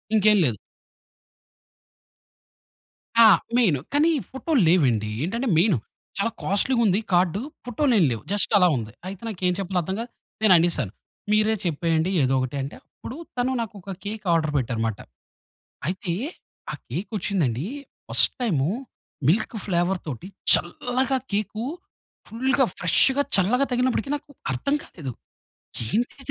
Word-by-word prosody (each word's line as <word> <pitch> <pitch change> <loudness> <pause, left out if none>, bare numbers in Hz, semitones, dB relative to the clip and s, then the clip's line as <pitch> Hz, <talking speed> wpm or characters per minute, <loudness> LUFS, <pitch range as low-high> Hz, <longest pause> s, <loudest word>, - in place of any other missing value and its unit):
ఇంకేం 210 0 +5
లేదు. 115 -5 0 2.7
ఆ! - - +9 0.3
మెయిను, 180 - +3
కానీ 305 +3 +4 0.2
ఫోటోలు 265 +1 0
లేవండి. 120 - +3
ఏంటంటే, 235 +9 -2
మెయిను 175 - +4 0.4
చాలా 225 +3 0
కాస్ట్లీగుంది 205 0 +2
కార్డు. 180 +3 +2 0.2
పొటోలేం 245 - +2
లేవు, 115 - -3
జస్ట్ 205 - +2
అలా 180 -2 +5
ఉంది. 110 -1 -5 0.2
అయితే 195 +1 -7
నాకెం 180 -4 -1
చెప్పాలో 185 -1 -1
అర్థం 190 +4 -3
కాక 235 +1 -5 0.3
నేననేసాను, 170 - +4 0.4
మీరే 215 +1 +3
చెప్పేయండి 165 +2 0
ఏదో 130 - +2
ఒకటి 130 +2 -3
అంటే, 135 +2 -6
అప్పుడు 255 - -10 0.2
తను 250 +1 +1
నాకొక 200 -4 -7
కేక్ 210 0 -5
ఆర్డర్ 155 -2 +1
పెట్టారుమాట. 115 -4 -1 0.9
అయితే, 180 -1 -2 0.6
ఆ - - -5 0.2
కేకొచ్చిందండీ, 180 - -2 0.4
ఫస్ట్‌ - - +4
టైము, 155 - +1 0.6
మిల్క్ 215 +7 +2
ఫ్లేవర్‌తోటి 175 - -2 0.3
చల్లగ 245 +9 +1 0.2
కేకు 215 +2 -1 0.6
ఫుల్‌గా, 260 +3 +1
ఫ్రెష్‌గా, 265 +10 +3
చల్లగా 235 +9 +3
తగిలినప్పుడికి 250 +1 0
నాకు 290 - -9 0.2
అర్థం 205 - 0
కాలేదు. 140 -7 -7 0.8
ఏంటిది 245 - -2
190 Hz, 115 wpm, -24 LUFS, 165-230 Hz, 2.7 s, ఆ